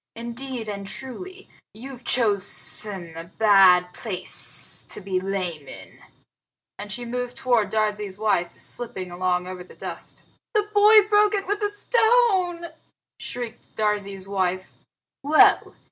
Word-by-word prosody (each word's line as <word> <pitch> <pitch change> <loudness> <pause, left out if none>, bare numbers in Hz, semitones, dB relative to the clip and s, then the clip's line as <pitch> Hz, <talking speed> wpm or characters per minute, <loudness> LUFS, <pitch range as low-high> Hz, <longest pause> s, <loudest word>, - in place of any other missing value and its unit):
Indeed 235 0 -6
and 200 -1 -5
truly, 365 - -7 0.3
you've 255 +2 -10
chosen 200 -5 0
a 165 0 -7
bad 185 -2 +5
place 200 -6 -3
to - - -4
be 190 -2 -2
lame 185 -6 -4
in." - - -12 0.8
And 205 0 -7
she 240 +3 -4
moved 245 +1 -4
toward 240 -5 +2
Darzee's 210 -2 -1
wife, 205 -5 0
slipping 190 -7 -4
along 180 0 -1
over 185 0 -7
the - - -17
dust. - - -8 0.3
"The 420 - +4
boy 420 0 +7
broke 420 0 +4
it 395 - -2
with 410 +2 -2
a 415 - +1
stone!" 410 -5 +2 0.5
shrieked 240 -2 -7
Darzee's 200 -3 -1
wife. 185 -1 -2 0.5
"Well! 295 +3 +4
215 Hz, 130 wpm, -24 LUFS, 190-275 Hz, 0.8 s, boy